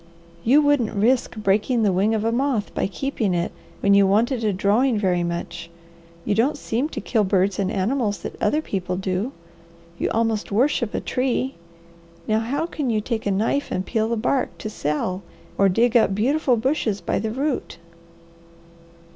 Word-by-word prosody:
"You 280 +6 +5
wouldn't 290 -7 +2
risk 240 +6 +2
breaking 215 +3 +1
the 205 - +3
wing 205 +5 +2
of 215 - -1
a 225 - +2
moth 245 -3 0
by - - 0
keeping 215 -3 -2
it 170 0 -1 0.3
when 200 - +4
you 200 -1 +6
wanted 230 +5 +2
a 215 - +2
drawing 210 +6 +2
very 185 -4 +1
much; 170 0 -4 0.6
you - - +1
don't 260 +8 +2
seem 265 +2 -2
to 240 - -5
kill 215 +1 +1
birds 190 0 +1
and 195 0 0
animals 210 +1 -1
that - - -5
other 305 +1 +1
people 185 - -3
do. 190 +5 -2 0.7
You - - 0
almost 225 -2 0
worship 240 +1 +1
a - - 0
tree; 260 +1 -1 0.7
now 215 0 +2
how 275 +8 -1
can 300 -6 -3
you 220 -2 +1
take 220 0 -3
a - - +2
knife 225 +8 0
and 185 - -2
peel 220 -1 0
the 235 - 0
bark 250 +4 0
to 215 - -6
sell 180 +3 -2 0.3
or 195 0 +4
dig 235 +6 +2
up 220 -4 +4
beautiful 255 +3 +2
bushes 225 -4 0
by - - -1
the 220 +2 -2
root." 265 - -2
220 Hz, 180 wpm, -23 LUFS, 200-255 Hz, 0.7 s, you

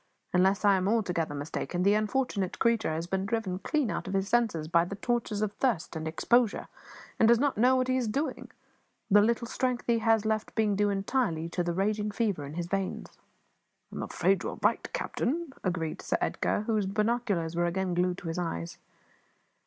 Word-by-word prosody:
Unless 190 +3 +3
I 200 -1 +6
am 185 0 0
altogether 180 -9 0
mistaken, 160 +4 -3
the 200 +2 +5
unfortunate 215 -3 0
creature 230 -6 +2
has 160 +2 -2
been 190 +2 -1
driven 205 -4 -2
clean 290 0 0
out - - -4
of 190 - -3
his 195 0 0
senses 220 -10 +1
by 170 +1 +4
the 180 +3 -5
tortures 220 -1 -1
of 210 - -1
thirst 220 -12 0
and 160 0 -4
exposure, 225 +8 +2 0.5
and 225 - +6
does 235 +1 +6
not 285 +3 +1
know 250 +4 +4
what 255 0 +1
he 255 0 +2
is 250 -3 0
doing; 255 +1 -2 0.6
the 205 +1 +7
little 235 +2 +1
strength 250 0 -1
he 235 -1 +2
has 225 -1 +2
left 215 -1 -1
being 215 -2 +2
due 205 +1 +2
entirely 195 -4 0
to 175 - -2
the 175 - -1
raging 210 +2 0
fever 205 -7 -1
in 145 - -8
his 175 0 -2
veins." 195 +1 -3 0.8
"I - - -6
am - - -3
afraid 190 +1 +1
you - - -3
are - - -8
right, - - +1
captain," 335 - -2
agreed 170 -4 -2
Sir - - 0
Edgar, - - 0
whose 215 -2 0
binoculars 210 -5 0
were 175 0 +1
again 185 +1 -1
glued 180 +1 +1
to 175 - -8
his 165 +2 -2
eyes. 85 - -4
205 Hz, 200 wpm, -29 LUFS, 180-235 Hz, 0.8 s, the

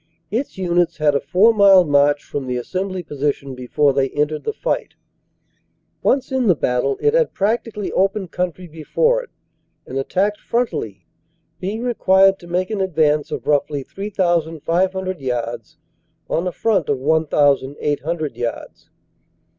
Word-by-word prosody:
Its 240 +2 -3
units 175 -2 +1
had 150 -2 +2
a 140 - +2
four 185 +12 +4
mile 200 -3 +7
march 145 -1 +3
from 140 -2 -5
the 125 -1 -2
assembly 185 +7 -3
position 140 -2 -3
before 130 +3 +1
they 135 0 +1
entered 150 +2 -2
the - - 0
fight. 430 - -3 1.1
Once 265 -1 +1
in 260 -3 +1
the 180 - +5
battle, 125 0 0
it 440 - +2
had - - +1
practically 210 0 -1
open 195 0 0
country 180 +1 -3
before 175 - 0
it, - - -14 0.6
and 135 - -4
attacked 200 +9 0
frontally, 110 - -2 0.5
being 210 +5 -4
required 195 -5 +3
to 175 - -13
make 180 +3 -1
an 210 -3 -1
advance 155 -5 +1
of - - -5
roughly 145 -1 0
3,500 185 0 -1
yards 120 -3 -4 0.5
on 170 +3 -1
a - - -1
front 195 -5 0
of - - +1
1,800 145 0 0
yards. 120 -1 -6
170 Hz, 140 wpm, -20 LUFS, 145-195 Hz, 1.1 s, mile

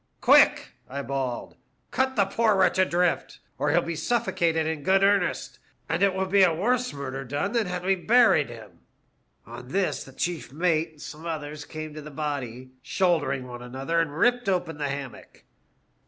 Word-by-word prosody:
" - - -47
* - - -45
Quick,' - - +5 0.2
I 140 +2 -4
bawled; 130 -2 -4 0.2
' - - -45
cut 265 0 0
the 200 -4 +3
poor 215 +2 +2
wretch 190 0 +3
adrift, 180 -1 +1 0.2
or 145 - +1
he'll 170 +4 +3
be 170 0 -4
suffocated 165 -4 0
in 160 -1 -2
good 190 +6 +3
earnest, 200 -2 +1 0.3
and 165 +3 -1
it 200 -2 +3
will 190 0 0
be 195 +1 +3
a 185 -2 +6
worse 240 +9 0
murder 135 -1 -5
done 145 +10 -2
than 230 -4 0
had 180 0 -4
we 195 - +4
buried 215 - +4
him.' 115 -3 -12 0.4
'' - - -44
On 120 +2 -10
this 190 +7 -1
the 135 - -13
chief 170 +2 -3
mate 165 +1 +1
and 150 - -18
some 160 +3 -8
others 150 -2 -5
came 155 0 -7
to 155 - -8
the 150 - -9
body, 130 -4 -5
shouldering 145 -7 0
one 120 -1 -8
another, 135 +7 -2
and 150 -2 -4
ripped 245 +3 +2
open 170 -5 -1
the 145 -1 -1
hammock. 140 -2 -8
160 Hz, 195 wpm, -26 LUFS, 140-190 Hz, 0.4 s, a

